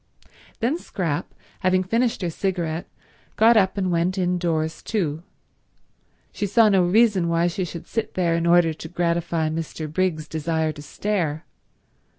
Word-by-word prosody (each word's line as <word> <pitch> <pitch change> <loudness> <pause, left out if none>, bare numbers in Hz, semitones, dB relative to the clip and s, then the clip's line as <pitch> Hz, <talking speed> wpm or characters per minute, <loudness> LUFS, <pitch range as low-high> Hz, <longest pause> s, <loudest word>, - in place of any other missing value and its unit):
Then 265 +9 +1
Scrap, 165 - -3 0.3
having 185 0 +2
finished 230 +2 0
her 170 - -1
cigarette, 170 -3 -2 0.5
got 230 +2 +5
up 195 -2 +3
and 185 -2 0
went 175 +3 +1
indoors 175 -3 -1
too. 165 -8 -2 1.1
She 205 - -2
saw 220 +2 +5
no 190 -3 +4
reason 195 -1 +3
why 170 0 +2
she 175 +2 -1
should 170 -1 -7
sit 225 -1 -3
there 175 -2 +1
in 170 0 0
order 170 -1 +5
to 160 - -9
gratify 170 -2 0
Mr. 160 0 -4
Briggs's 160 -1 -1
desire 160 0 -1
to 145 - -10
stare. 160 -2 -2
175 Hz, 150 wpm, -23 LUFS, 160-190 Hz, 1.1 s, got